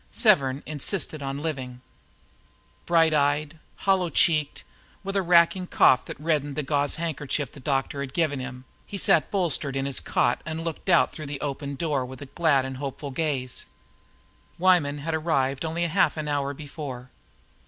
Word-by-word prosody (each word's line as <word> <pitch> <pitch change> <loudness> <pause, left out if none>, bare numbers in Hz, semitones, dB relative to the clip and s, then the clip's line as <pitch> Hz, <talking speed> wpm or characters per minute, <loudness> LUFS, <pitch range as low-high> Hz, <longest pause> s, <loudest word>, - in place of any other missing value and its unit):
Severn 140 - +3
insisted 155 +1 -1
on 140 +1 -4
living. 130 -6 -4 1.1
Bright 165 -2 +4
eyed, 145 +2 +1 0.2
hollow 190 -3 +1
cheeked, 155 -4 +2 0.4
with 195 +1 -4
a 195 - +3
racking 175 +1 +4
cough 130 -6 +4
that - - -8
reddened 150 -3 0
the 150 - -2
gauze 145 0 +1
handkerchief 150 -3 -2
the - - -13
doctor 135 +1 -1
had 140 -1 -5
given 155 -5 +1
him, 130 0 -7 0.2
he 200 - -5
sat 165 -3 +3
bolstered 165 -7 -1
up - - 0
in 135 - -2
his 140 -1 -1
cot 120 - +1
and 160 +1 -4
looked 165 +3 -5
out 170 - +5
through 155 -2 -7
the 140 -1 -5
open 140 0 -4
door 145 -3 -1
with 130 +2 -9
glad 150 -6 +3
and 130 -1 -5
hopeful 140 +1 -5
gaze. 135 -4 -2 0.9
Weyman 175 -5 +3
had 160 +3 -4
arrived 140 -4 0
only 165 +2 -1
half 165 0 +2
an 155 -1 -3
hour 145 -1 -1
before. 140 -4 -8
145 Hz, 165 wpm, -26 LUFS, 135-165 Hz, 1.1 s, out